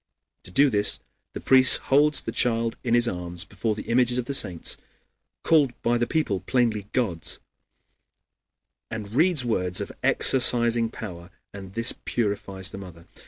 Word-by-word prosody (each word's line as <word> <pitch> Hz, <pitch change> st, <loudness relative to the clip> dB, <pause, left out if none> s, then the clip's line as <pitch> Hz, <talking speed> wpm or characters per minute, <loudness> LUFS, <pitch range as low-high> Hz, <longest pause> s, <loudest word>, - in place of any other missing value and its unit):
To -, -, -10 dB
do 140 Hz, +9 st, +3 dB
this 105 Hz, -1 st, +1 dB, 0.3 s
the -, -, -6 dB
priest 130 Hz, 0 st, +6 dB, 0.2 s
holds 145 Hz, -1 st, +4 dB
the -, -, -5 dB
child 115 Hz, -2 st, 0 dB
in 120 Hz, -1 st, +1 dB
his 120 Hz, 0 st, +4 dB
arms 90 Hz, -2 st, -1 dB
before 105 Hz, +2 st, -4 dB
the -, -, -7 dB
images 125 Hz, +1 st, +1 dB
of 125 Hz, -, -2 dB
the 140 Hz, -, -4 dB
saints 90 Hz, -11 st, 0 dB, 0.7 s
(called 145 Hz, -7 st, +2 dB
by 120 Hz, 0 st, +1 dB
the 120 Hz, -, -1 dB
people 155 Hz, -, -1 dB
plainly 115 Hz, -5 st, -1 dB
gods) 90 Hz, -11 st, -2 dB, 1.5 s
and 110 Hz, -2 st, -7 dB
reads 155 Hz, -1 st, +3 dB
words 90 Hz, -6 st, 0 dB
of -, -, -5 dB
exorcizing 120 Hz, -3 st, +2 dB
power, 90 Hz, -7 st, -9 dB, 0.2 s
and 95 Hz, -1 st, -11 dB
this 115 Hz, +1 st, +4 dB
purifies 100 Hz, -4 st, -3 dB
the 100 Hz, -, -9 dB
mother. 85 Hz, -3 st, -12 dB
115 Hz, 155 wpm, -24 LUFS, 95-125 Hz, 1.5 s, priest